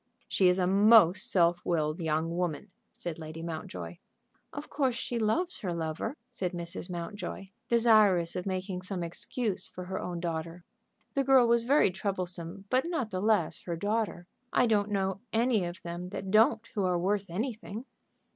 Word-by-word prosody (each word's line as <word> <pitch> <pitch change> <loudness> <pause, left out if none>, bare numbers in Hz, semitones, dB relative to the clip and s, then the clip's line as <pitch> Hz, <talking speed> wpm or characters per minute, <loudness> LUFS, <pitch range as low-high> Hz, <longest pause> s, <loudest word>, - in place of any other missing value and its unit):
"She 190 - +3
is 180 - +2
a 185 - +2
most 195 -1 +6
self 175 -1 +4
willed 155 -2 0
young 160 0 -1
woman," 180 +2 -2 0.2
said 170 -2 -6
Lady 160 +1 -7
Mountjoy. 90 - -6 0.5
"Of 290 +1 -7
course 265 -5 0
she 240 0 -3
loves 335 +12 0
her 180 -4 -3
lover," 160 - -3
said 185 -7 -3
Mrs. 170 +1 -3
Mountjoy, 190 +2 -6 0.2
desirous 215 -7 +4
of 180 +1 -3
making 185 -1 -3
some 185 -1 -3
excuse 200 +5 -2
for 180 - -8
her 190 +1 -4
own 175 -1 -4
daughter. 170 0 -4 0.5
The 275 - +1
girl 265 -2 +6
was 235 0 +4
very 275 -6 +4
troublesome, 185 -1 -4
but 260 +5 +2
not 270 -11 -2
the 185 -1 -2
less 210 -6 +1
her 170 - -2
daughter. 205 -1 -2 0.3
"I - - +4
don't 210 -3 +2
know 195 -1 -1
any 225 -4 +2
of 175 +1 -7
them 175 +1 -5
that 190 0 -5
don't 225 +1 +4
who 205 - -1
are 180 -1 +2
worth 195 +2 -1
anything." 220 +3 -4
185 Hz, 170 wpm, -30 LUFS, 170-220 Hz, 0.5 s, most